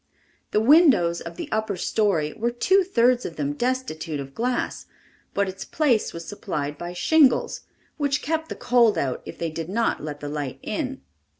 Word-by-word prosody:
The - - +2
windows 235 - +5
of - - -8
the 340 -4 -5
upper 215 -3 -1
story 175 -7 +1
were 235 +2 -1
two 375 +11 +3
thirds 250 -8 +3
of 165 - -6
them 145 -1 -2
destitute 185 - -2
of 135 -1 -7
glass, 245 - -2 0.5
but 200 0 +2
its 190 +1 -6
place 270 -8 +1
was 170 -1 -8
supplied 150 -8 -4
by 175 +3 -6
shingles, 285 - +3 0.4
which 285 -2 0
kept 320 +1 -1
the - - -4
cold 235 -5 +3
out 135 -5 -1
if - - -8
they 165 -1 -3
did 165 +1 -5
not 230 -2 0
let 150 -1 -5
the 145 - -6
light 145 -3 -4
in. 270 +3 -3
215 Hz, 180 wpm, -24 LUFS, 160-260 Hz, 0.5 s, windows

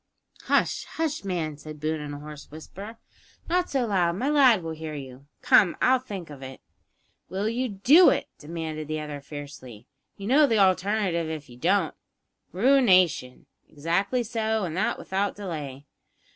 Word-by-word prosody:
"Hush! - - +1
hush, 315 -5 -2
man!" 165 -6 -3
said 150 0 -10
Boone 155 +1 -2
in 145 -1 -6
a 145 - -7
hoarse 150 0 -10
whisper; 195 +8 -10 0.5
"not 360 +1 +1
so 265 -3 0
loud; 180 -5 +1
my 260 +9 -1
lad 255 - +5
will 165 - -4
hear 160 -1 -6
you. 135 -1 -10 0.2
Come, 185 -5 +5
I'll 260 0 +4
think 195 -10 -8
of 140 -2 -11
it." 130 0 -9 0.7
"Will 195 +3 -2
you 245 +3 -1
do 265 - +6
it?" - - 0
demanded 155 -1 -5
the 155 0 -3
other 150 -2 -6
fiercely. 140 -6 -10 0.3
"You 200 - -8
know 285 +6 +5
the 225 -4 +2
alternative 185 -3 +2
if 155 -5 -6
you - - -12
don't?" 175 +3 +1 0.6
"Ruination?" 185 - +3 0.2
"Exactly 185 - 0
so; 220 -1 -1
and 170 -3 -3
that 190 - 0
without 195 +2 -2
delay." 150 -8 -6
175 Hz, 160 wpm, -26 LUFS, 150-220 Hz, 0.7 s, do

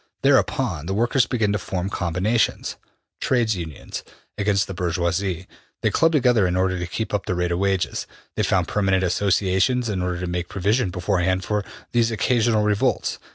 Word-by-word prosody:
Thereupon 75 +2 +2
the 95 - -1
workers 120 +3 +2
begin 110 -5 +1
to 105 - 0
form 90 0 -3
combinations 95 +5 0 0.4
(Trades 115 -5 +1
Unions) 80 -5 -6 0.3
against 100 -1 +1
the 95 - -6
bourgeois; 85 -1 0
they 95 -1 -3
club 165 0 +3
together 125 - +3
in 90 - -1
order 95 -1 +1
to 90 - -3
keep 110 +5 -4
up 105 - -1
the 90 - 0
rate 90 0 0
of 85 - 0
wages; 95 -2 0 0.3
they - - 0
found - - +1
permanent 95 -2 +1
associations 100 +6 +1
in 95 -3 -1
order 90 -1 -2
to 90 - -3
make 90 0 -3
provision 105 +3 +1
beforehand 95 +1 0
for 105 +1 -1 0.3
these 115 -1 +3
occasional 115 0 +2
revolts. 105 -1 +1
95 Hz, 170 wpm, -23 LUFS, 90-110 Hz, 0.4 s, club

